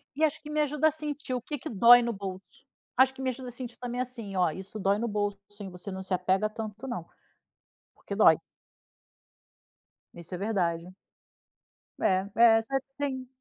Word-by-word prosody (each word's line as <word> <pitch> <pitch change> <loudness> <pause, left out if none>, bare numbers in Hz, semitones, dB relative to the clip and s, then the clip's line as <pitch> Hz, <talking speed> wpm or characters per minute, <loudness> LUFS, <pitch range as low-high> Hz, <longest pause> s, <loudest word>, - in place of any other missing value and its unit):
E 310 - -1
acho 310 0 +2
que 300 - -10
me 305 0 +1
ajuda 300 +1 +2
a 315 - +3
sentir 295 -3 -5
o 250 - -1
que 295 +4 -5
que - - -6
dói 235 +3 +8
no 235 -1 -1
bolso. 195 +5 -8 0.3
Acho 260 +1 +5
que 265 - -9
me 260 - 0
ajuda 255 0 -5
a - - -8
sentir 245 0 -8
também, 245 0 -4
assim, 235 -6 -5
ó: 180 -3 +3
"Isso 195 +5 -8
dói 195 +1 +2
no 235 +2 -1
bolso, 205 -1 -1 0.2
hein, 195 - -6
você 180 +2 -8
não 190 - -5
se 190 0 -3
apega 190 +3 +1
tanto 220 +3 -6
não. 235 -10 -4 0.9
Porque - - -7
dói." - - +7 1.8
Isso 170 +1 -10
é - - -4
verdade. 180 -4 -1 1.1
É 190 +1 +2
é. 225 -1 +7
Você 270 +5 -1 0.2
tem 265 -3 -3
225 Hz, 190 wpm, -29 LUFS, 195-260 Hz, 1.8 s, dói